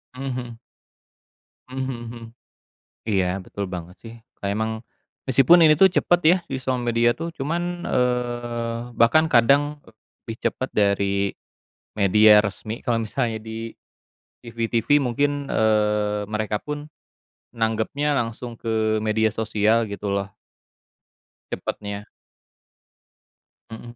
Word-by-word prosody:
Mhm 130 - -7
mhm. 125 -3 -5 1.1
Mhm 130 +1 -5
mhm 130 -2 -4
mhm, 115 0 -9 0.8
iya, 95 -3 0
betul 100 +1 -6
banget 90 0 -7
sih, 115 0 -10 0.3
kayak 100 0 -1
emang 110 0 -2 0.5
meskipun 165 +7 +6
ini 155 -1 +6
tuh 190 - +7
cepet 175 -1 +2
ya 175 +3 +7
di 135 - -2
sosial 130 -1 -2
media 120 0 +2
tuh 165 +1 -5
cuman, 175 +4 -3
eee, 120 -2 -1 0.2
bahkan 155 +8 +4
kadang, 140 +5 +3
eee, - - -18 0.3
lebih 115 - -6
cepat 130 - -5
dari 100 -1 +1 0.7
media 105 +2 +6
resmi, 105 +2 -5
kalau 115 -1 0
misalnya 115 0 -2
di 110 +1 -7 0.7
TV-TV 115 +3 +1
mungkin, 145 +2 0
eee, 105 -1 +1
mereka 105 0 -2
pun 150 +4 -7 0.7
nanggapnya 115 +6 0
langsung 115 +1 -5
ke 110 -1 0
media 110 0 +1
sosial 110 +1 +1
gitu 100 0 -4
loh. 100 0 -1 1.2
Cepatnya. 100 0 -5 1.6
Mhm, 120 +1 -10
115 Hz, 120 wpm, -23 LUFS, 105-130 Hz, 1.6 s, tuh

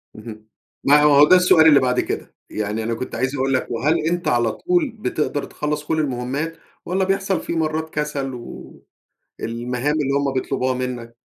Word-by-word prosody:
اهم. 110 -1 -11 0.4
ما 145 +1 +5
هو 145 -1 +7
ده 185 - +7
السؤال 180 -3 +6
اللي 145 -3 +7
بعد 125 -1 +1
كده، - - -4
يعني 105 +1 -3
أنا 115 +1 -2
كنت 120 +3 -5
عايز 130 +4 -1
أقول 135 0 0
لك، 130 - 0
وهل 140 +8 +1
أنت 175 +1 -1
على 120 -2 +2
طول 350 -6 0
بتقدر 150 -7 -2
تخلّص 150 0 -3
كلّ 160 +1 -1
المهمات؟ 140 +3 -3 0.3
والّا 190 +2 0
بيحصل 195 -2 0
في - - -4
مرّات 160 -1 -1
كسل 145 -3 -3
و 120 -1 -10 0.6
المهام 125 +5 -2
اللي 145 -3 0
همّ 140 -1 0
بيطلبوها 130 0 -1
منّك؟ 125 -2 -5
140 Hz, 175 wpm, -21 LUFS, 125-160 Hz, 0.6 s, هو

